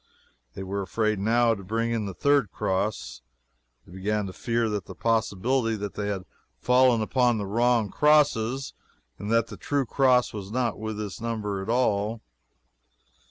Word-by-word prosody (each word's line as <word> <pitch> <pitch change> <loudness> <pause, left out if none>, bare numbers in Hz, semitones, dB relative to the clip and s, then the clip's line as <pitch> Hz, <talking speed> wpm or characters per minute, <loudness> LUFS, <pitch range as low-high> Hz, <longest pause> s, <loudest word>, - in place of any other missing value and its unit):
They 95 - -5
were 100 +1 -3
afraid, 110 +2 -1
now, 115 +3 +3
to 100 -3 -7
bring 115 +4 -1
in 110 -3 -1
the 95 - -6
third 140 -6 +2
cross. 95 +2 -2 0.6
They - - -17
began 105 +3 -2
to 95 - -7
fear 115 +2 -1
that 105 -2 -2 0.2
possibly 115 +2 +1
they 105 0 -4
had 95 -3 -3 0.3
fallen 125 -2 +3
upon 120 +1 +2
the 105 - -3
wrong 115 +1 +1
crosses, 140 -4 +2 0.5
and 105 +2 -4
that 115 -1 +3
the - - -9
true 140 -2 -1
cross 125 0 +3
was 100 -2 -6
not 120 -2 -1
with 110 -1 -4
this 105 -1 -6
number 105 -4 -3
at 95 - -7
all. 110 -2 0
110 Hz, 160 wpm, -26 LUFS, 100-120 Hz, 0.6 s, now